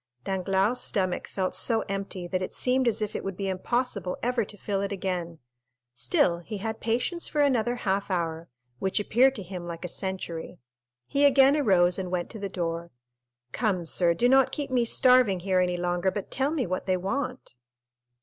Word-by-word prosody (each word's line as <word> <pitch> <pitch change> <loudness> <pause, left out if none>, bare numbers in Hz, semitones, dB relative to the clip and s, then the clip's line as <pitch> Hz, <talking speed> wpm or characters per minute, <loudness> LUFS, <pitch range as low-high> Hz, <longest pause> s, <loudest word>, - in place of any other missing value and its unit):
Danglars' 195 +5 0
stomach 185 -3 -1
felt 185 -1 -2
so 225 -2 +2
empty, 195 -2 -4
that 185 +1 -2
it 185 - -4
seemed 255 0 +1
as 220 -1 +1
if 210 - -4
it - - -3
would 195 -2 -5
be 195 - -2
impossible 195 0 -2
ever 245 -1 +1
to 205 +1 -9
fill 200 -1 -2
it 200 - -2
again; 180 -4 -3 0.6
still 125 +8 +2
he 210 +5 -6
had 220 +2 -4
patience 245 +10 -1
for 300 - 0
another 245 -4 +2
half 200 -4 -1
hour, 165 -2 -2 0.3
which 190 +1 0
appeared 250 +6 +3
to 200 - -4
him 180 -1 -7
like 170 +1 -6
a - - -2
century. 180 -2 -4 0.5
He 280 - +1
again 275 0 +6
arose 185 -10 +3
and 185 -1 -3
went 180 -1 -2
to 220 - -8
the 200 -1 -4
door. 170 -2 -3 0.6
"Come, 190 - -1
sir, 170 +1 +2
do 240 - +3
not 265 +1 +5
keep 285 -3 -4
me 245 -2 +2
starving 250 -6 +4
here 185 0 +1
any 180 -1 +1
longer, 175 +1 0
but 200 0 -5
tell 270 +1 +1
me 305 -4 -1
what 185 +1 -3
they 185 -1 +2
want." 250 - -4
195 Hz, 190 wpm, -27 LUFS, 180-245 Hz, 0.6 s, again